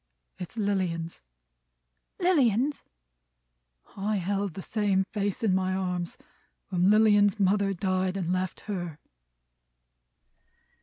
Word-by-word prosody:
"It's 180 +5 -8
Lilian's." 185 -5 -1 1.0
"Lilian's!" 285 - +2 1.1
"I 205 +2 -1
held 195 -1 -1
the 190 - -6
same 205 -3 +1
face 205 +3 -3
in 205 -4 +3
my 185 0 +1
arms 180 -2 -3 0.5
when 180 0 +2
Lilian's 210 -1 +5
mother 200 +1 +2
died 185 0 0
and 180 -2 -1
left 185 0 -2
her." 175 -7 -5
195 Hz, 100 wpm, -28 LUFS, 185-210 Hz, 1.1 s, Lilian's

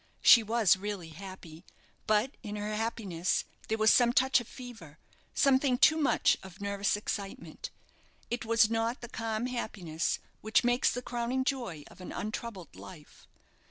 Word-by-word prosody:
She 235 - +9
was 220 -3 +3
really 195 -4 -5
happy, 175 -1 -10 0.4
but 215 +5 +2
in 210 -3 -6
her 210 +1 -3
happiness 205 -6 -1 0.2
there 220 - 0
was 220 0 +5
some 240 -1 +5
touch 260 0 +4
of 235 - -11
fever, 225 - -11 0.4
something 265 -1 +3
too 310 - +6
much 305 -3 +3
of 190 -1 -12
nervous 200 0 0
excitement. 210 - -5 0.6
It 240 0 -2
was 225 -1 +4
not 230 +3 -1
the 240 - -7
calm 225 0 -3
happiness 195 -10 -2 0.2
which 220 +2 +2
makes 245 +1 +3
the 250 - -4
crowning 245 +2 -1
joy 240 - -3
of - - -15
an 180 - -7
untroubled 215 -3 -6
life. 155 -5 -13
220 Hz, 155 wpm, -30 LUFS, 195-245 Hz, 0.6 s, She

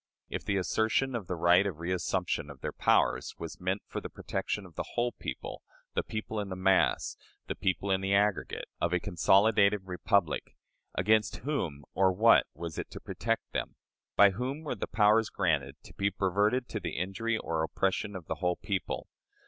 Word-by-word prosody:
If - - -4
the 100 - 0
assertion 110 +7 +1
of 110 -7 -3
the 90 - -2
right 85 +4 +5
of 95 - -3
reassumption 90 -2 -1
of 70 -2 -11
their - - -3
powers - - +2
was 85 - -7
meant 95 +2 -1
for - - -5
the - - -6
protection 95 +1 -3
of 90 - -14
the - - -6
whole 120 0 +1
people - - -6 0.3
the - - +1
people 110 0 -4
in 100 - -3
mass 95 0 +3 0.3
the - - -3
people 95 +1 -1
"in 95 0 +2
the 95 +1 +2
aggregate" 100 0 +1
of 85 +1 0
a 90 - +3
consolidated 100 +4 +4
republic 90 -1 0 0.4
against 105 +3 +3
whom 80 - -2
or 95 -1 +4
what 110 +5 +5
was 85 0 -5
it - - -5
to - - -8
protect - - -2
them? - - -3 0.4
By 100 -1 +7
whom 130 +9 -4
were 150 - -2
the 110 - -4
powers 105 +1 +4
granted 70 -6 0
to - - -14
be 100 0 +1
perverted 100 +6 +1
to 105 - -3
the 90 - -4
injury 110 +6 -1
or 80 -6 -2
oppression 95 +5 -1
of 90 -3 -7
the - - -3
whole 90 -1 +2
people? 100 -1 -3
95 Hz, 185 wpm, -30 LUFS, 90-105 Hz, 0.4 s, By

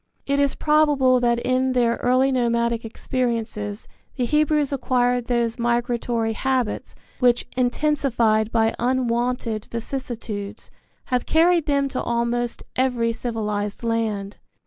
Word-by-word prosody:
It 280 0 +1
is 280 -1 +2
probable 295 -4 +3
that 240 -1 +2
in 255 +2 +1
their 235 -2 +2
early 255 +2 +2
nomadic 235 -2 +1
experiences 225 -3 -3 0.3
the 250 - 0
Hebrews 300 +1 +2
acquired 245 -2 +1
those 235 -1 0
migratory 235 -1 0
habits 255 -2 -2 0.2
which, 245 -2 +3
intensified 245 -4 +1
by 225 -1 +2
unwonted 240 -2 0
vicissitudes, 230 -4 -6 0.4
have 250 - +1
carried 330 0 +3
them 280 -1 +2
to 260 - -3
almost 235 0 -1
every 245 -3 +1
civilized 210 -3 -3
land. 220 -3 -2
240 Hz, 115 wpm, -23 LUFS, 230-260 Hz, 0.4 s, probable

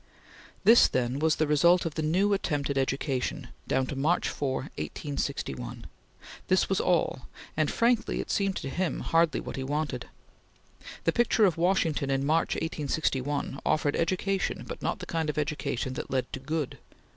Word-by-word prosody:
This, 230 +2 +8
then, 125 +1 -1
was 155 0 +3
the 155 - +1
result 170 +5 +4
of 165 - -2
the 160 - -2
new 185 +7 +2
attempt 145 -7 -1
at 140 - -2
education, 135 -1 -1 0.2
down 130 0 +1
to 140 - -5
March 155 +6 +1
4, 135 0 -3
1861; 130 -4 -4 0.6
this 185 - +3
was 195 - +1
all; 170 -7 +1 0.3
and 155 -1 +1
frankly, 235 -1 +1
it - - -3
seemed 195 -1 +1
to 135 - -4
him 180 +5 -1
hardly 165 -1 +2
what - - -6
he 135 - -2
wanted. 150 +3 -2 1.0
The - - +3
picture 235 -2 +3
of 180 -5 +2
Washington 165 -5 +1
in 135 0 +1
March, 160 +3 +2
1861, 145 -3 -1
offered 150 -2 +1
education, 185 +3 -1
but - - -7
not - - -1
the - - -7
kind 165 -2 -1
of 150 - -3
education 140 -4 -2
that - - -5
led 130 -1 -2
to - - -3
good. 150 +1 -3
150 Hz, 170 wpm, -28 LUFS, 135-170 Hz, 1.0 s, This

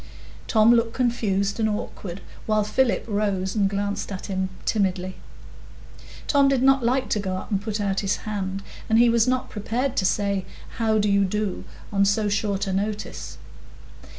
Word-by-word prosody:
Tom 220 +1 +5
looked 230 -1 +2
confused 210 -5 0
and 220 -1 +2
awkward, 195 -3 -5 0.3
while 215 -1 +2
Philip 240 +4 +1
rose 200 -3 -1
and 200 -3 +2
glanced 200 +1 -2
at 185 - -5
him 190 -1 -2 0.2
timidly. 185 -3 0 1.1
Tom 280 -1 +4
did 270 -2 +2
not 270 -1 +5
like 255 +2 +1
to 210 - +1
go 190 -2 -2
up - - -8
and 200 -1 +1
put 215 0 -3
out 195 -1 0
his 200 0 0
hand, 195 -2 -3 0.3
and 220 - +4
he 240 +1 +6
was 230 0 +3
not 255 0 0
prepared 245 +5 -2
to 190 - +2
say, 200 -1 +1 0.4
"How 220 -1 +2
do 210 0 +2
you 200 0 +3
do?" 205 0 -2 0.3
on 200 0 +3
so 205 +1 +2
short 200 0 0
a 190 - -2
notice. 205 - -3
205 Hz, 175 wpm, -24 LUFS, 195-225 Hz, 1.1 s, he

